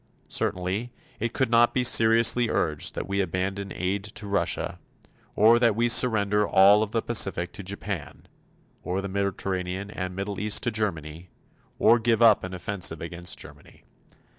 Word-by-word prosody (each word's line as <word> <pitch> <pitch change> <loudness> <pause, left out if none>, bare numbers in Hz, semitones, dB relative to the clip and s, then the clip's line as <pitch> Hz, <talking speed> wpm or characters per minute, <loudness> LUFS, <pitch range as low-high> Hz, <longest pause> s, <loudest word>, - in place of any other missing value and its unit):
Certainly, 95 +7 -2 0.3
it 115 +1 -2
could 130 -2 -1
not 120 0 +4
be 130 - +2
seriously 115 0 +4
urged 75 -3 -1
that - - -5
we 100 0 -1
abandon 95 +2 -3
aid 95 +2 -3
to 105 0 -9
Russia, 100 0 -2 0.6
or 115 +3 +5
that 115 -3 +2
we 120 +2 +1
surrender 105 -4 +3
all 100 +2 +5
of 110 - -1
the 115 +1 -2
Pacific 95 -6 0
to - - -7
Japan, 100 -4 -7 0.5
or 90 +2 -3
the 100 - -5
Mediterranean 95 0 -3
and 95 -2 -5
Middle 100 +1 -4
East 105 0 0
to 120 - 0
Germany, 85 -6 -4 0.5
or 120 +1 +4
give 115 -1 +1
up 110 -3 +5
an 95 0 -6
offensive 90 -2 -2
against 85 +1 -6
Germany. - - -14
100 Hz, 160 wpm, -25 LUFS, 95-110 Hz, 0.6 s, or